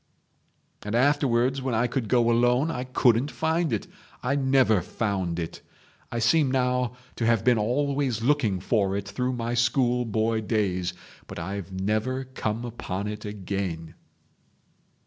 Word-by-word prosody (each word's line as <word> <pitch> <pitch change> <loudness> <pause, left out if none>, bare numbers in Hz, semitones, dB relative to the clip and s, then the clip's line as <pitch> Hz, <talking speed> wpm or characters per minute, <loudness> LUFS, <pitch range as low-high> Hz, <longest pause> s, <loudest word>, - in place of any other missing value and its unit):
"And 105 +2 -3
afterwards 130 -1 +2
when 130 -3 -1
I 115 +2 +2
could 120 -2 -2
go 120 -2 +3
alone 125 +6 +3
I 125 -3 -3
couldn't 125 +1 +3
find 160 +1 0
it. 110 - -1 0.4
I 125 - +1
never 130 -7 +3
found 95 -3 -2
it. 85 -2 -5 0.5
I 120 - -3
seem 135 +5 +3
now 125 -1 0 0.2
to 115 - 0
have 115 -3 +3
been 120 -2 +4
always 130 0 0
looking 120 -8 +2
for 100 -2 +1
it 100 0 -5
through 125 +4 -2
my 120 -1 -2
school 120 +1 +2
boy 110 0 0
days, 95 -5 -1 0.3
but - - -8
I've 95 +2 -5
never 110 +7 -1
come 120 -3 -3
upon 100 -4 -4
it 105 0 -6
again." 95 -5 -4
115 Hz, 145 wpm, -26 LUFS, 105-130 Hz, 0.5 s, been